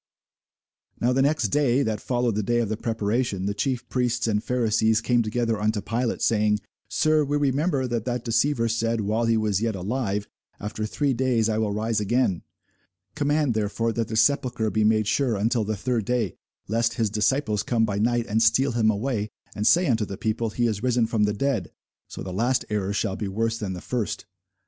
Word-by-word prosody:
Now 125 +2 +2
the 135 - +2
next 140 -5 +2
day, 140 +1 +2
that 110 -3 -2
followed 120 -2 0
the 105 - 0
day 120 +4 0
of 115 -3 0
the 110 - -1
preparation, 110 -2 -1
the 100 - 0
chief 125 +3 -2
priests 125 -2 0
and 105 -1 0
Pharisees 110 -3 +2
came 120 +1 +2
together 115 -1 -1
unto 105 0 +1
Pilate, 115 +4 -2
saying, 105 -1 +2 0.3
Sir, 155 -1 +2
we 145 +1 0
remember 140 0 +1
that 120 -3 -2
that 125 -1 -2
deceiver 115 +1 +1
said, 115 0 0
while 110 +3 0
he 115 0 +3
was 105 -2 0
yet 115 -2 0
alive, 105 +1 -2 0.3
After 105 +1 -4
three 140 +4 0
days 120 -3 +1
I 110 0 0
will 110 -2 0
rise 110 +1 0
again. 105 -3 +1 0.7
Command 145 -3 +1
therefore 110 +2 -1
that 115 -1 -1
the 110 - -4
sepulchre 120 -2 +2
be 110 - +1
made 110 0 +3
sure 125 +2 +1
until 115 +3 +1
the 105 0 -2
third 115 0 -1
day, 120 -5 0 0.3
lest 115 +2 0
his 110 -3 0
disciples 110 0 +1
come 115 -2 +1
by 100 -2 -2
night, 120 +2 +1
and 110 +1 0
steal 115 +5 +4
him 115 -2 +2
away, 110 0 -1 0.2
and 105 0 -1
say 175 +2 +5
unto 115 -7 +1
the 100 -1 -7
people, 110 +1 -1
He 120 +3 -1
is 110 -3 -1
risen 125 -2 +2
from 110 -2 +1
the 105 - 0
dead: 115 -4 -1 0.4
so - - -8
the 95 - -6
last 120 +6 +1
error 100 -2 -1
shall 100 -1 -1
be 105 - -4
worse 115 +3 -1
than 100 -3 -3
the 90 - -7
first. 120 -4 -3
115 Hz, 200 wpm, -25 LUFS, 105-125 Hz, 0.7 s, say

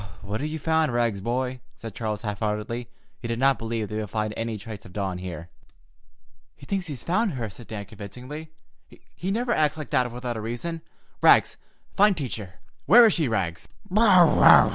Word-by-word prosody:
"What 105 +4 -4
have 150 - -2
you 160 - -4
found, 160 -1 +1
Rags, 115 -5 0
boy?" 125 +3 -2 0.2
said 115 -3 -9
Charles 105 -1 -3
half 105 -2 -3
heartedly. 110 +3 -3 0.3
He 120 - -6
did 115 0 -2
not 135 +2 +3
believe 115 -1 -3
they 105 - -5
would 105 -2 -4
find 110 -1 -2
any 115 -1 -3
trace 105 -1 -9
of 90 - -14
Dawn 95 -3 -3
here. 85 -2 -7 1.1
"He - - -14
thinks 195 -3 -2
he's 140 -6 -7
found 200 +2 +1
her," 115 -5 -4
said 115 +4 -13
Dan 105 -2 -6
convincingly. 125 +10 -9 0.6
"He 180 +5 -5
never 235 +4 0
acts 155 0 +1
like 155 - -7
that 125 -1 +2
without 120 -1 -4
a - - -4
reason. 120 +10 -4 0.4
Rags, - - +5 0.4
find 205 -2 +4
Teacher! 110 - -5 0.3
Where 235 +4 +9
is 220 - +5
she, 160 -5 +1
Rags?" 95 -7 -2
115 Hz, 185 wpm, -25 LUFS, 105-150 Hz, 1.1 s, Where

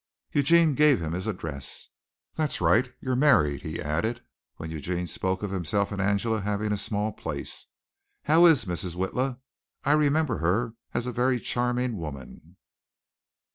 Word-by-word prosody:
Eugene 160 +2 +4
gave 150 -1 +4
him 80 -2 -3
his 90 +5 -3
address. 80 -9 -5 0.4
"That's 155 -3 -1
right, 110 +9 +3
you're 130 -1 -1
married," 100 - +3
he 80 +1 -5
added, 110 +11 -2 0.3
when 80 0 -7
Eugene 85 +3 -3
spoke 95 +4 -2
of 100 - -3
himself 100 +2 0
and 100 -1 -2
Angela 100 +2 +1
having 105 +1 -1
a - - +2
small 105 +2 -1
place. - - -5 0.6
"How 165 +4 +6
is 145 -9 +5
Mrs. 90 -1 -3
Witla? 125 +8 -1 0.5
I 145 - +3
remember 150 -3 +2
her 110 +8 0 0.2
as 120 - 0
a 125 - -2
very 125 +1 +1
charming 125 -1 -1
woman. 75 -6 -9
105 Hz, 150 wpm, -27 LUFS, 90-125 Hz, 0.6 s, How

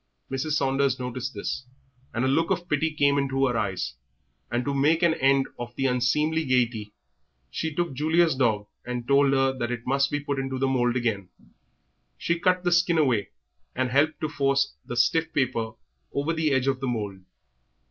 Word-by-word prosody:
Mrs. 135 +3 -2
Saunders 135 -2 +1
noticed 125 -1 -4
this, 115 +5 -4 0.4
and 120 +3 -1
a - - +2
look 160 +5 +2
of 175 -2 -1
pity 155 0 +1
came 145 -2 +2
into 135 -1 +1
her 125 -2 0
eyes, 95 -8 -2 0.6
and 120 +1 -1
to 140 - -1
make 150 +5 +2
an 170 -1 +5
end 135 -2 +3
of 120 0 -6
the 135 - -1
unseemly 150 +6 +1
gaiety 120 -6 0 0.6
she 160 -2 -3
took 175 -3 -1
Julia's 160 +4 +2
dog 115 -6 +1 0.2
and 125 -1 -5
told 140 0 +4
her 135 0 +2
that 120 -2 -3
it 120 -1 -5
must 135 +1 +2
be 145 - -1
put 140 -1 -3
into 135 -1 -3
the 135 - +1
mould 125 -2 +1
again. 110 -7 -1 0.9
She 170 0 -1
cut 185 0 +2
the 175 - +1
skin 175 -1 +3
away, 125 -9 +2 0.5
and 130 -1 -1
helped 145 +4 +2
to 155 - 0
force 140 -2 +1
the 120 - -6
stiff 165 +6 +2
paper 115 -5 0 0.4
over 145 +4 -1
the 160 -1 +1
edge 130 -1 +2
of 135 -1 0
the 135 - -3
mould. 105 -5 -3
135 Hz, 190 wpm, -26 LUFS, 125-150 Hz, 0.9 s, an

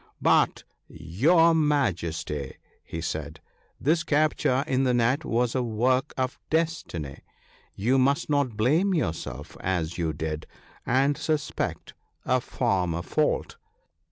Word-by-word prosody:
' - - -46 0.2
But, - - +1 0.2
your 140 - +3
Majesty/ 85 - -1 0.3
he 80 - -6
said, 80 -1 -4 0.2
' - - -39
this 165 +1 +4
capture 145 -3 +2
in 130 0 +1
the 125 -2 +2
net 125 +6 +2
was 120 -2 0
a 130 - +1
work 125 +4 +1
of 130 -1 -2
destiny; 160 - -2 0.6
you 125 +7 +2
must 140 +2 +2
not 140 -7 0
blame 160 - +2
yourself 80 - -3
as 90 -2 -2
you 80 -2 0
did, 80 0 -4 0.4
and 135 +4 +3
suspect 150 -1 -2 0.3
a - - +2
former 85 -3 -1
fault. 155 - 0
125 Hz, 130 wpm, -26 LUFS, -, 0.6 s, this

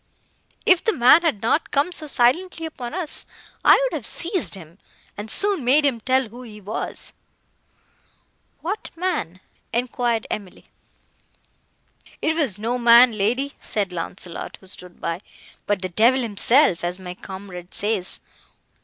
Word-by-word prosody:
If 365 -2 +5
the 445 - +2
man 255 +5 +6
had 300 - -1
not 265 +8 +1
come 290 +5 +1
so 315 -3 -1
silently 325 +7 +2
upon 255 -4 -6
us, 350 -5 -4 0.4
I - - +8
would - - -1
have - - -5
seized 345 - 0
him, 170 0 -13 0.4
and 210 +1 -7
soon 395 - +4
made 280 +5 +4
him 260 -5 +1
tell 260 -1 +1
who 240 +3 -11
he 215 -4 -11
was." 210 +3 -4 1.5
"What 395 +6 -4
man?" 255 - -3 0.3
enquired 240 -1 -1
Emily. 200 -3 -6 1.5
"It 320 +1 0
was 280 - +2
no 235 +4 -2
man, 240 +1 +7
lady," 235 +7 -1
said 200 -3 -2
Launcelot, 170 0 -6
who - - -18
stood 180 -1 -12
by, 170 +2 -3 0.5
"but 205 -2 0
the 185 - -2
devil 235 +8 +3
himself, 230 - +3
as 175 +2 -2
my 180 -1 -7
comrade 190 -1 -10
says. 205 -3 -1
235 Hz, 145 wpm, -22 LUFS, 195-290 Hz, 1.5 s, I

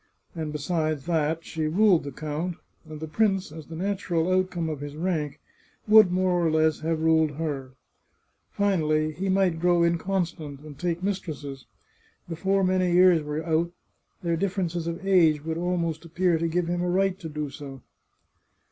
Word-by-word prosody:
And 160 -3 -4
besides 155 -1 -1
that, 160 -1 0
she 160 -2 -2
ruled 185 -1 +4
the 140 - -5
count, 155 +5 -4 0.3
and 155 -1 -7
the 160 - -5
prince, 195 -1 +1
as 155 -1 -10
the 165 - -8
natural 185 -2 -1
outcome 185 -3 0
of 155 -3 -4
his 145 0 -7
rank, 155 -3 -2 0.5
would 215 -3 +7
more 180 -1 +1
or 165 - +3
less 155 0 +2
have 160 0 -1
ruled 160 -2 +3
her. 140 -4 -4 0.8
Finally, 155 -6 +1
he 190 +5 -3
might 185 -3 +2
grow 175 0 +3
inconstant 170 -4 -1
and 150 -2 -11
take 175 0 -2
mistresses. 150 -9 -4 0.6
Before 190 +4 0
many 185 -1 +2
years 180 -2 +6
were 150 +2 -4
out, 170 +1 0 0.5
their 170 -1 +1
difference 185 -1 -1
of 170 +3 -5
age 160 -6 +4
would 160 0 -2
almost 170 -2 -1
appear 170 0 +1
to 165 - 0
give 170 +1 0
him 175 0 -1
a 180 - 0
right 190 +1 +1
to 165 -5 -6
do 150 -2 -4
so. 135 -3 -9
165 Hz, 165 wpm, -26 LUFS, 155-180 Hz, 0.8 s, would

